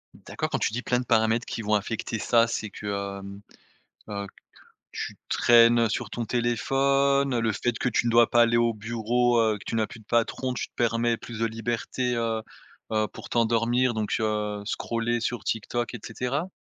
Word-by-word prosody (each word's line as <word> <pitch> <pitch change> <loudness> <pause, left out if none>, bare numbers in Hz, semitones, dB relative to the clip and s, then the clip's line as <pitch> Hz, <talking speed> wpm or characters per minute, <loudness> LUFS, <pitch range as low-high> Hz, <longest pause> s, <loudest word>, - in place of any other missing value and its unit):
D'accord, - - -5
quand - - 0
tu - - -1
dis 125 - -2
plein 125 -1 0
de 125 - -4
paramètres 110 +1 +2
qui - - -4
vont 105 0 +1
affecter 110 +2 -2
ça, 115 +3 +3
c'est 110 -2 -4
que, 105 - -8 0.3
hem, 100 +1 -9 0.7
heu, 100 -1 -4
qu - - -21 0.5
tu - - -5
traînes 115 -1 +5
sur 105 - -3
ton 120 -1 -4
téléphone, 135 +3 +2
le 115 -1 +1
fait 120 +3 -1
que - - 0
tu 120 0 +1
ne - - +2
dois 115 0 +5
pas 120 - +5
aller 115 0 +3
au 115 -1 +2
bureau, 120 +2 +1
heu, 110 -2 +2
que - - -14
tu - - -4
n'as 110 -1 +1
plus 115 - -12
de - - -19
patron, 120 +3 0
tu 125 - -4
te - - -55
permets 115 0 +1
plus 115 0 -9
de 115 - +1
liberté, 120 +2 -2
heu, 115 -1 -1 0.5
heu, 110 -1 +1
pour - - -11
t'endormir 120 +2 +2
donc, 110 -1 -2
heu, 105 -1 -1
scroller 115 +1 -1
sur 120 +1 -3
TikTok 120 +2 -2
et 120 - -6
cetera? 130 +9 -3
115 Hz, 200 wpm, -26 LUFS, 110-120 Hz, 0.7 s, traînes